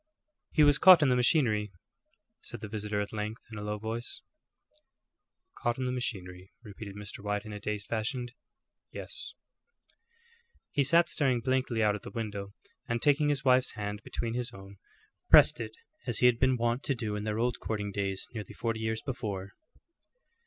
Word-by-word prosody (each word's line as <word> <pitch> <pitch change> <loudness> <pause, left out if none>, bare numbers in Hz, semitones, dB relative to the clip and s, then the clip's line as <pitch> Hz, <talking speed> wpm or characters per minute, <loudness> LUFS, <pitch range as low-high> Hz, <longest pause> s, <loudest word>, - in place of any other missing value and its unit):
"He 155 - +4
was 145 0 +5
caught 180 -4 +9
in 140 - +4
the 125 - +4
machinery," 120 - +3 0.7
said - - -6
the 110 - -6
visitor 105 -1 -2
at 105 - -5
length 105 +1 -4
in 110 - -6
a - - -6
low 105 0 -3
voice. 110 +3 -5 1.4
"Caught 120 0 0
in 130 - -2
the 125 - -1
machinery," 95 -7 -4
repeated 100 -2 -9
Mr. 105 -1 -7
White, 105 0 -2
in 110 - -7
a 105 - -6
dazed 105 0 -3
fashion, 120 +3 -2 0.6
"yes." - - -8 1.4
He 140 - +2
sat 170 +5 +5
staring 140 -6 +2
blankly 130 -2 0
out 105 -1 +4
at 105 - -5
the - - -8
window, 100 -3 -5 0.3
and 115 0 0
taking 145 +3 +3
his 140 -2 -1
wife's 130 0 +4
hand 105 -1 -4
between 115 +3 -4
his 125 0 -2
own, 95 +1 -12 0.5
pressed - - +7
it - - -6 0.3
as 120 -3 0
he - - +3
had 120 -1 +5
been 130 -1 +3
wont 120 +2 0
to 135 - +1
do 110 -4 -3
in 105 - -3
their 105 0 -2
old 120 +1 0
courting 105 -2 -3
days 95 -1 -2
nearly 110 -3 -6
forty 115 -1 -2
years 110 0 -2
before. 100 -7 -4
110 Hz, 180 wpm, -30 LUFS, 105-125 Hz, 1.4 s, caught